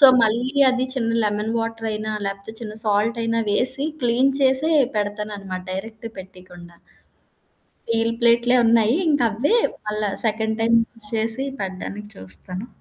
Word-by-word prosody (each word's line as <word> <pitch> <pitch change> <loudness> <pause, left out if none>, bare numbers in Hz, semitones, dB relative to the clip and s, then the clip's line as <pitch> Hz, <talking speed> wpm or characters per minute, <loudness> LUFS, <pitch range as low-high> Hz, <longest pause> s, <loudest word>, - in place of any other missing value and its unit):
So, - - +7 0.2
మళ్ళీ 235 +5 0 0.2
అది 255 0 -1
చిన్న 230 -3 -2
లెమన్ 210 +1 -2
వాటర్ 225 0 -5
అయినా 215 0 -4
లేపోతే, 195 +2 -7
చిన్న 215 -2 -7
సాల్ట్ 215 +3 0
అయినా 230 0 -1
వేసి 260 +7 +4 0.2
క్లీన్ 245 +3 +2
చేసే 265 +4 +6 0.3
పెడతాన్నమాట 205 -2 -5
డైరెక్ట్ 220 +4 -7
పెట్టయకుండా. 180 -2 -13 1.1
స్టీల్ 230 0 0
ప్లేట్‌లే 235 +1 +3
ఉన్నాయి. 230 +2 +3
ఇంక 295 -2 +1
అవ్వే 250 - 0 0.3
మళ్ళా 210 -1 -2 0.2
సెకండ్ 220 0 -2
టైమ్ 230 +1 +3
యూజ్ 225 -2 -6
చేసి 225 +4 +2 0.2
పెడ్డానికి 195 +2 -7
చూస్తాను. 180 - -9
220 Hz, 135 wpm, -21 LUFS, 205-235 Hz, 1.1 s, So